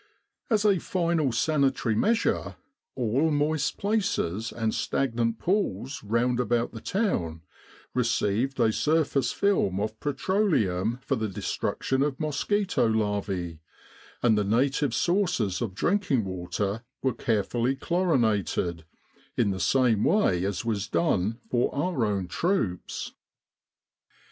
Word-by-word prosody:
As 215 -3 +2
a 200 -4 +4
final 170 -7 0
sanitary 135 -2 +1
measure, 220 - +1 0.4
all 130 +5 +1
moist 150 0 0
places 195 - -1
and 110 -2 -1
stag 135 -4 -1
nant 115 -1 0
pools 140 - -1
round 120 +3 +1
about 120 -1 +1
the 115 - -9
town 85 - -1 0.5
received 125 +1 0
a 110 -2 +3
surface 145 -4 +1
film 185 - +1
of 110 +1 -3
petroleum 135 - 0
for 135 - 0
the 110 -3 -2
destruction 130 +6 -2
of 140 -2 0
mosquito 180 - 0
larvae; 100 -6 -1 0.6
and 115 -3 +5
the 105 - +2
native 135 +7 +1
sources 170 - +1
of 105 -6 -3
drinking 150 - +1
water 95 +4 -3 0.2
were 130 -2 +2
carefully 115 +3 0
chlorinated, 110 - 0 0.5
in 100 - +2
the 95 - -3
same 120 -2 +3
way 95 - +3
as 100 +3 -2
was 105 -3 -1
done 90 +6 +1
for 120 -1 +1
our 145 -6 0
own 100 -3 -1
troops. 115 - -2
120 Hz, 120 wpm, -27 LUFS, 105-155 Hz, 0.6 s, and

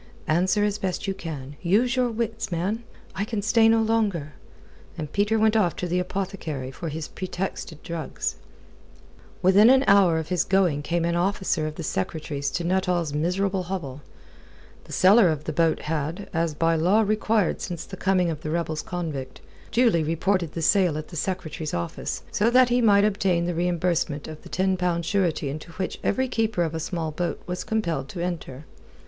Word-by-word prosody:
"Answer 185 +6 +2
as 210 0 0
best 185 -2 -2
you 195 - 0
can. 145 -6 -7
Use 225 +8 +2
your 250 -1 +2
wits, 225 -2 -3
man. 190 +7 -1 0.3
I 200 - -2
can 215 -1 -3
stay 225 +1 +5
no 225 0 +4
longer." 205 -10 0 0.6
And 150 -1 -6
Peter 205 +2 +2
went 220 0 +3
off 185 -6 +2
to 180 - -3
the 180 +1 0
apothecary 180 -8 -4
for 165 +5 -5
his 155 +1 -5
pretexted 185 -4 -5
drugs. 165 -4 -4 1.1
Within 200 +5 +7
an 265 +1 +6
hour 195 -5 +5
of 160 -1 -4
his 180 -2 +2
going 180 -6 +2
came 170 +3 -1
an 170 - 0
officer 185 -3 0
of 155 - -6
the 165 - -6
Secretary's 140 +4 -2
to 175 - -3
Nuttall's 175 -3 0
miserable 185 +5 0
hovel. 170 -7 -5 0.8
The - - -13
seller 195 +1 +6
of 155 -2 -2
the 155 - -4
boat 165 +1 +2
had 160 +5 -3
as 165 -2 0
by 165 +1 +2
law 180 +7 +3
required 215 -2 +1
since 175 -3 -5
the 190 - -8
coming 185 -2 +1
of 155 -1 -6
the 155 - -4
rebels 160 -1 -1
convict 160 -7 -5 0.3
duly 230 -9 +3
reported 165 +1 0
the 165 - -3
sale 180 -4 +3
at 155 - -6
the 175 - -10
Secretary's 165 -3 -3
office, 85 0 -4
so 215 +3 +2
that 250 +1 +5
he 245 +1 +3
might 205 -3 +5
obtain 190 -4 +1
the 175 - -1
reimbursement 170 -3 0
of 155 -1 -9
the - - -13
ten 190 0 +1
pound 175 -2 0
surety 175 -7 0
into 155 +4 -6
which 185 +2 -4
every 260 0 +1
keeper 220 -6 0
of 165 -1 -2
a 160 - -2
small 165 -1 -3
boat 175 +3 -3
was 180 0 -4
compelled 170 -11 -2
to 180 - -7
enter. 165 -5 -4
175 Hz, 185 wpm, -25 LUFS, 160-200 Hz, 1.1 s, Within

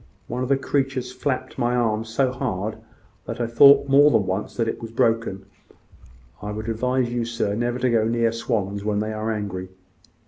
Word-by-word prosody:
One 125 - -4
of 130 - -2
the 140 - +4
creatures 135 -2 -1
flapped 130 -1 -3
my 120 +1 +1
arm 115 -2 0
so 125 +4 0
hard, 110 -6 -3 0.5
that - - -5
I 120 - 0
thought 140 +5 +6
more 140 +2 +6
than 105 - +2
once 95 +5 -4
it 115 0 -1
was 115 - -6
broken. 115 -4 0 1.0
I 105 - -5
would 110 +1 -5
advise 125 +2 0
you, 120 -1 0
sir, 115 -3 -2
never 120 +3 -1
to 125 0 +1
go 110 -2 +3
near 115 0 +1
swans 105 -4 -2
when 105 0 -1
they 110 +1 -2
are 110 +1 -2
angry." 100 -4 -4
115 Hz, 185 wpm, -23 LUFS, 110-125 Hz, 1.0 s, thought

